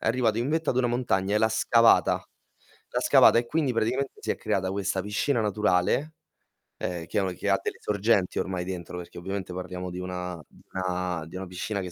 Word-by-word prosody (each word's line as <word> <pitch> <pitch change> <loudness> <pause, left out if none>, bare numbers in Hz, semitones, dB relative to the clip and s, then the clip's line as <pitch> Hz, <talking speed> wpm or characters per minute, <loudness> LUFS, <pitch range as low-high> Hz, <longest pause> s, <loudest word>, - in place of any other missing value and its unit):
È - - -5
arrivato 115 -1 +2
in 120 +3 0
vetta 160 +1 +1
ad - - -2
una 130 -1 +3
montagna 110 -5 0
e - - +4
l'ha 110 - +3
scavata 115 +1 +4 0.7
l'ha - - 0
scavata, - - +6
e 120 - +1
quindi 145 0 0
praticamente 125 +5 0
si - - -3
è - - 0
creata 95 -1 -1
questa 100 -1 -1
piscina 110 +5 0
naturale, 105 - +1 0.7
uhm, 85 -2 -3
che 105 - -1
ha - - +1
un 95 -1 -2
che 95 +3 -2
ha 100 - +3
delle - - -4
sorgenti 100 -2 +1
ormai 90 -1 -2
dentro, 90 -1 -6
perché 90 -1 -9
ovviamente 95 0 -4
parliamo 90 0 -5
di 90 - -6
una 90 -2 -5
di - - -21
una 90 -3 -2
di 80 - -11
una 95 +1 -4
piscina 95 +3 -3
che 90 -1 -6
95 Hz, 210 wpm, -27 LUFS, 90-115 Hz, 0.7 s, scavata